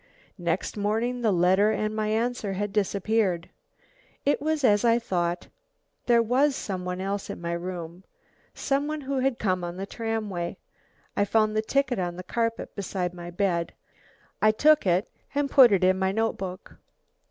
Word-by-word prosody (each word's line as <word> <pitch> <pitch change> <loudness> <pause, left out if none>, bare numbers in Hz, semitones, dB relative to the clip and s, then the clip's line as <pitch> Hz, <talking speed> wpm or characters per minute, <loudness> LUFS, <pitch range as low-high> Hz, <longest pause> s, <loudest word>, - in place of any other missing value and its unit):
Next 170 +4 -2
morning 225 +4 -1
the 220 -3 +2
letter 185 +3 +4
and 215 0 -1
my 215 -1 -1
answer 225 -2 -1
had 205 +1 -3
disappeared. 200 -3 0 0.7
It 285 0 +2
was 310 0 -1
as 205 -3 +4
I 230 -1 +4
thought; 175 -6 -2 0.6
there 235 -1 +5
was 265 +5 +2
some 185 -6 -4
one 180 0 -3
else 195 +1 -3
in - - -5
my 170 0 -4
room. 175 0 -6 0.5
Some 280 +1 0
one 305 0 -3
who 275 0 -2
had 260 -2 +1
come 185 -3 0
on 175 +1 -5
the 195 - -4
tramway. 215 -5 -3 0.6
I - - +2
found 215 +1 +2
the 215 - +2
ticket 260 0 0
on 175 -1 -2
the 180 - -7
carpet 230 +3 -2
beside 185 -3 -3
my 175 -1 -8
bed. 175 -2 -1 0.7
I 215 - +6
took 295 +3 +4
it 180 +4 +2 0.3
and 285 -1 0
put 255 -5 +8
it 195 -2 +3
in 185 +1 +3
my 190 0 +1
notebook!!!!! 195 -4 -3
205 Hz, 170 wpm, -26 LUFS, 185-235 Hz, 0.7 s, put